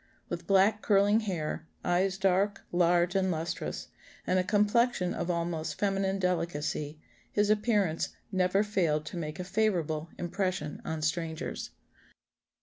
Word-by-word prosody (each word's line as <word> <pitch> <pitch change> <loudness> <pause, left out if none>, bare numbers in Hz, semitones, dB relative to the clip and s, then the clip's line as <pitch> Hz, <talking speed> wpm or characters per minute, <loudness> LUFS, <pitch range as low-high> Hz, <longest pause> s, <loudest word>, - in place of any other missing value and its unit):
With 170 0 -5
black 200 +2 +4
curling 205 +1 +4
hair, 165 -6 -3 0.2
eyes 185 +2 +2
dark, 195 +1 +1
large, 175 0 +3
and 190 -1 +2
lustrous, 165 0 -3 0.4
and 185 - +2
a - - +2
complexion 210 0 +2
of 175 - -3
almost 170 -2 -2
feminine 195 -1 +1
delicacy, 160 -4 -1 0.3
his 205 0 +2
appearance 210 -6 +1 0.2
never 185 +1 +2
failed 170 -8 +1
to - - -6
make 155 -1 -4
a - - -2
favourable 180 -6 0
impression 180 -3 -2
on 160 -1 -3
strangers." 160 0 -2
180 Hz, 130 wpm, -30 LUFS, 165-200 Hz, 0.4 s, black